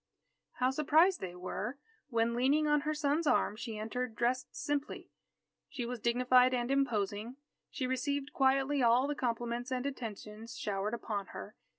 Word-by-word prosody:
How 255 Hz, +1 st, +1 dB
surprised 310 Hz, +6 st, +4 dB
they 180 Hz, -2 st, -6 dB
were, 200 Hz, +8 st, -4 dB, 0.3 s
when, 230 Hz, -1 st, +1 dB
leaning 275 Hz, +6 st, +3 dB
on 295 Hz, -1 st, +3 dB
her 305 Hz, +2 st, -1 dB
son's 300 Hz, +1 st, +1 dB
arm, 210 Hz, -, +3 dB
she 225 Hz, -1 st, -6 dB
entered 225 Hz, +2 st, -3 dB
dressed 245 Hz, +3 st, -1 dB
simply. 290 Hz, 0 st, -3 dB, 0.6 s
She 245 Hz, -, -4 dB
was 245 Hz, 0 st, -4 dB
dignified 250 Hz, +2 st, +4 dB
and 240 Hz, +1 st, -1 dB
imposing. 225 Hz, -4 st, 0 dB, 0.3 s
She 260 Hz, -, -3 dB
received 275 Hz, +2 st, -2 dB
quietly 270 Hz, +1 st, +2 dB
all 240 Hz, +2 st, +5 dB
the 295 Hz, -, -1 dB
compliments 240 Hz, -1 st, -2 dB
and 255 Hz, 0 st, -1 dB
attentions 225 Hz, -3 st, -6 dB
showered 205 Hz, +2 st, -2 dB
upon 205 Hz, -4 st, -4 dB
her. 210 Hz, -, -8 dB
250 Hz, 155 wpm, -33 LUFS, 230-275 Hz, 0.6 s, all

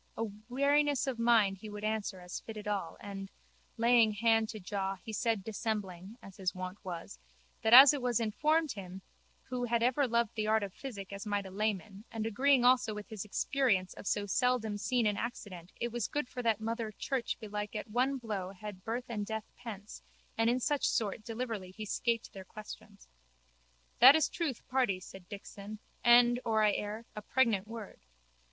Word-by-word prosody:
A 225 Hz, -, -1 dB, 0.3 s
wariness 285 Hz, +2 st, +2 dB
of 260 Hz, -4 st, -3 dB
mind 220 Hz, -5 st, +4 dB
he 215 Hz, -, -8 dB
would 210 Hz, 0 st, -7 dB
answer 215 Hz, -3 st, -2 dB
as 180 Hz, 0 st, -6 dB
fitted 215 Hz, -2 st, -8 dB
all 200 Hz, -5 st, -2 dB
and, 195 Hz, -1 st, -7 dB, 0.5 s
laying 230 Hz, -1 st, +5 dB
hand 225 Hz, +1 st, +2 dB
to 215 Hz, -, -6 dB
jaw, 195 Hz, 0 st, -2 dB
he 220 Hz, +4 st, -9 dB
said 225 Hz, -2 st, 0 dB
dissembling, 205 Hz, -2 st, -4 dB
as 195 Hz, -, -12 dB
his 185 Hz, -2 st, -2 dB
wont 185 Hz, +2 st, -6 dB
was, 170 Hz, -, -7 dB, 0.4 s
that 220 Hz, -, +1 dB
as 265 Hz, +4 st, +11 dB
it 285 Hz, -, -2 dB
was 245 Hz, -2 st, +1 dB
informed 300 Hz, +8 st, +1 dB
him, 190 Hz, -3 st, -8 dB, 0.5 s
who 250 Hz, -1 st, -2 dB
had 235 Hz, -1 st, +1 dB
ever 260 Hz, +3 st, +3 dB
loved 235 Hz, -2 st, +1 dB
the 215 Hz, -1 st, -2 dB
art 220 Hz, 0 st, +3 dB
of 195 Hz, -2 st, -5 dB
physic 200 Hz, -8 st, -7 dB
as 200 Hz, +2 st, -6 dB
might 205 Hz, -1 st, -1 dB
a 190 Hz, -, -8 dB
layman, 205 Hz, 0 st, -2 dB
and 220 Hz, -1 st, -3 dB
agreeing 255 Hz, +3 st, +3 dB
also 245 Hz, -4 st, +4 dB
with 210 Hz, 0 st, -8 dB
his 215 Hz, -3 st, -5 dB
experience 210 Hz, -3 st, +1 dB
of -, -, -9 dB
so 205 Hz, -, +1 dB
seldomseen 235 Hz, +1 st, +1 dB
an 205 Hz, -1 st, +1 dB
accident 190 Hz, -7 st, -6 dB
it 235 Hz, -, -2 dB
was 240 Hz, -2 st, -1 dB
good 295 Hz, -3 st, -2 dB
for 250 Hz, -, -5 dB
that 225 Hz, -3 st, +1 dB
mother 225 Hz, 0 st, -3 dB
Church 245 Hz, +3 st, -2 dB
belike 210 Hz, -2 st, -5 dB
at 215 Hz, -, -4 dB
one 255 Hz, +5 st, +1 dB
blow 210 Hz, -7 st, -4 dB
had 195 Hz, -1 st, -9 dB
birth 240 Hz, +3 st, -3 dB
and 215 Hz, -3 st, -3 dB
death 220 Hz, +1 st, -5 dB
pence 210 Hz, -3 st, -9 dB, 0.3 s
and 225 Hz, +1 st, +2 dB
in 245 Hz, +2 st, +2 dB
such 290 Hz, +2 st, +1 dB
sort 215 Hz, -2 st, -1 dB
deliverly 225 Hz, -5 st, -4 dB
he 215 Hz, +4 st, -7 dB
scaped 230 Hz, +2 st, -1 dB
their 195 Hz, -, -8 dB
questions. 210 Hz, -, -11 dB, 0.9 s
That 265 Hz, +4 st, +10 dB
is 315 Hz, -, +3 dB
truth, 305 Hz, -9 st, -3 dB
pardy, 250 Hz, -8 st, +1 dB
said 185 Hz, 0 st, -12 dB
Dixon, 205 Hz, +1 st, -8 dB, 0.3 s
and, 240 Hz, 0 st, +6 dB
or 220 Hz, -2 st, +2 dB
I 210 Hz, -, +5 dB
err, 210 Hz, +3 st, -4 dB
a 210 Hz, -, -5 dB
pregnant 215 Hz, -4 st, +1 dB
word. 225 Hz, -2 st, -9 dB
220 Hz, 185 wpm, -32 LUFS, 200-240 Hz, 0.9 s, as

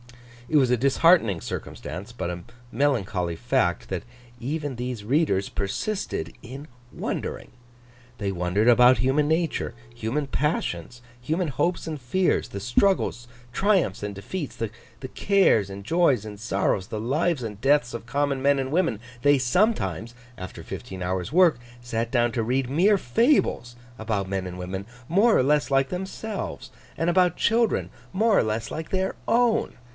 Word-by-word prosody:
It 155 Hz, -, +3 dB
was 130 Hz, -3 st, +4 dB
a -, -, +5 dB
disheartening 135 Hz, -, +4 dB
circumstance, -, -, -6 dB
but -, -, -4 dB
a 90 Hz, 0 st, -5 dB, 0.3 s
melancholy 110 Hz, -10 st, 0 dB
fact, 120 Hz, -8 st, 0 dB
that 95 Hz, -3 st, -3 dB, 0.4 s
even 145 Hz, +1 st, -3 dB
these 120 Hz, -3 st, -5 dB
readers 120 Hz, -, +1 dB
persisted 100 Hz, -, -3 dB
in 135 Hz, +5 st, -9 dB, 0.2 s
wondering. -, -, -4 dB, 0.7 s
They 100 Hz, -4 st, -2 dB
wondered 90 Hz, +5 st, 0 dB
about 125 Hz, +1 st, +7 dB
human 135 Hz, +6 st, +2 dB
nature, 160 Hz, -7 st, 0 dB, 0.2 s
human 120 Hz, +6 st, -2 dB
passions, 125 Hz, -, -2 dB, 0.2 s
human 160 Hz, +6 st, -1 dB
hopes 170 Hz, +7 st, -1 dB
and 155 Hz, -3 st, -5 dB
fears, 180 Hz, +10 st, +1 dB
the 100 Hz, -, -6 dB
struggles, 120 Hz, -, +1 dB, 0.2 s
triumphs 190 Hz, -, +1 dB
and 105 Hz, 0 st, -3 dB
defeats, 145 Hz, -, -6 dB
the 115 Hz, -2 st, -3 dB, 0.4 s
cares 190 Hz, -, +3 dB
and 100 Hz, 0 st, -8 dB
joys 145 Hz, -, +2 dB
and 105 Hz, -1 st, -8 dB
sorrows, 95 Hz, -2 st, -1 dB
the 110 Hz, -, -4 dB
lives 145 Hz, +5 st, 0 dB
and 105 Hz, -2 st, -6 dB
deaths 135 Hz, -2 st, +3 dB
of 115 Hz, -1 st, -6 dB
common 140 Hz, 0 st, 0 dB
men 140 Hz, +1 st, +3 dB
and 135 Hz, 0 st, -3 dB
women! 160 Hz, -, +1 dB, 0.2 s
They 145 Hz, +1 st, +5 dB
sometimes, 120 Hz, -, 0 dB, 0.2 s
after 95 Hz, 0 st, -8 dB
fifteen 95 Hz, -1 st, -7 dB
hours' 90 Hz, +2 st, -2 dB
work, 170 Hz, -5 st, +5 dB, 0.2 s
sat 115 Hz, -1 st, -3 dB
down 120 Hz, -2 st, +2 dB
to 115 Hz, -, 0 dB
read 125 Hz, +2 st, 0 dB
mere 190 Hz, +9 st, +4 dB
fables 125 Hz, -, +1 dB, 0.2 s
about 105 Hz, -3 st, -2 dB
men 95 Hz, -1 st, -2 dB
and 90 Hz, 0 st, -7 dB
women, 95 Hz, +2 st, -5 dB, 0.2 s
more 210 Hz, +7 st, +4 dB
or -, -, +3 dB
less 145 Hz, +1 st, +2 dB
like 135 Hz, 0 st, +3 dB
themselves, 190 Hz, +3 st, -5 dB, 0.3 s
and 165 Hz, -, +1 dB
about 180 Hz, -1 st, +3 dB
children, 230 Hz, -1 st, +2 dB, 0.2 s
more 215 Hz, +2 st, +3 dB
or -, -, +4 dB
less 110 Hz, +1 st, -2 dB
like 160 Hz, 0 st, -5 dB
their 190 Hz, 0 st, -1 dB
own. 235 Hz, -1 st, +2 dB
125 Hz, 155 wpm, -25 LUFS, 105-165 Hz, 0.7 s, about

